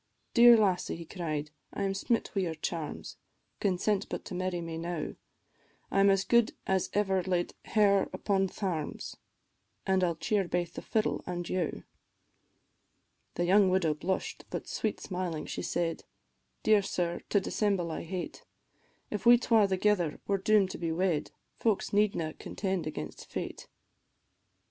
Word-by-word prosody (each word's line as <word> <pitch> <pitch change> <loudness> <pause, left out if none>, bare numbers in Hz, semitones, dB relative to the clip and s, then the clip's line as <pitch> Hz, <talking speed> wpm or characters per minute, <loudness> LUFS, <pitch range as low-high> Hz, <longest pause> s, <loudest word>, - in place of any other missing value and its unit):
"Dear 235 0 +9
lassie," 190 -4 +1
he 170 0 -8
cried, 155 -4 -4 0.2
"I 200 - -3
am 195 0 0
smit 225 +4 0
wi' 195 - +1
your 165 -3 -2
charms, 155 0 -5 0.4
Consent 200 +1 0
but - - -5
to 205 - -7
marry 185 0 -1
me 165 -1 -5
now, 170 -2 -3 0.8
I - - +2
'm 200 0 +6
as 195 -1 +3
good 235 0 +3
as 190 -1 +1
ever 195 -2 +2
laid 180 -1 -1
hair 200 -2 +3
upon 195 -2 +1
thairms, 175 -6 -4 0.7
An' 190 -1 +2
I - - +4
'll 170 - -1
cheer 195 +3 0
baith 175 -1 -1
the - - -6
fiddle 220 -1 0
an' 175 -1 -3
you." 180 -4 -2 1.5
The 175 - 0
young 195 +2 +5
widow 185 -4 +2
blush'd, 185 +5 -3
but - - -5
sweet 215 - -2
smiling 180 -5 -3
she - - -4
said, 170 -1 -1 0.6
"Dear 215 -1 +5
sir, 175 -3 -2
to 205 - +4
dissemble 195 -3 0
I - - -4
hate, 180 +2 -5 0.7
If 210 +1 -2
we 240 0 +9
twa 225 -4 +4
thegither 190 -4 +1
are 200 - +2
doom'd 200 -1 +3
to - - -7
be 165 -1 -1
wed, 170 -2 0 0.3
Folks 220 -3 0
needna 200 -6 +1
contend 190 -5 -3
against 75 - -6
fate." - - -5
185 Hz, 155 wpm, -30 LUFS, 170-200 Hz, 1.5 s, Dear